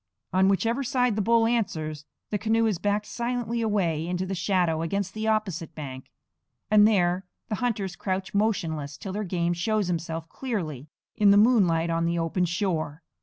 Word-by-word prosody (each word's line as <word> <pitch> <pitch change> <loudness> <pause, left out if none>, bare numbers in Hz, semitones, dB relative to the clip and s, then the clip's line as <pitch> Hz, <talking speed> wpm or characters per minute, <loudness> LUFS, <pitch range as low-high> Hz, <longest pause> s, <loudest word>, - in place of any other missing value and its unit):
On 190 +1 +4
whichever 230 +7 +1
side 250 -3 +1
the 215 - 0
bull 230 +2 +4
answers, 155 -10 -1 0.3
the 210 - 0
canoe 225 +2 +2
is 210 -6 0
backed 205 +2 0
silently 235 -1 -2
away 175 -8 0
into 180 +1 -1
the 190 - -3
shadow 175 -3 +1
against 190 +3 -2
the 220 0 -3
opposite 190 -8 -1
bank; 130 -4 -7 0.6
and 210 0 +7
there 180 -3 +1 0.2
the 215 - 0
hunters 205 -7 -1
crouch 190 -1 -3
motionless 160 -9 -1
till 190 +5 -6
their 210 +1 -2
game 175 -2 0
shows 200 +2 0
himself 165 -1 -3
clearly 160 - -4 0.3
in 205 -1 +4
the 200 - +7
moonlight 185 -8 +4
on 165 0 +1
the 170 0 0
open 170 +2 0
shore. 170 -4 -2
190 Hz, 170 wpm, -26 LUFS, 165-215 Hz, 0.6 s, and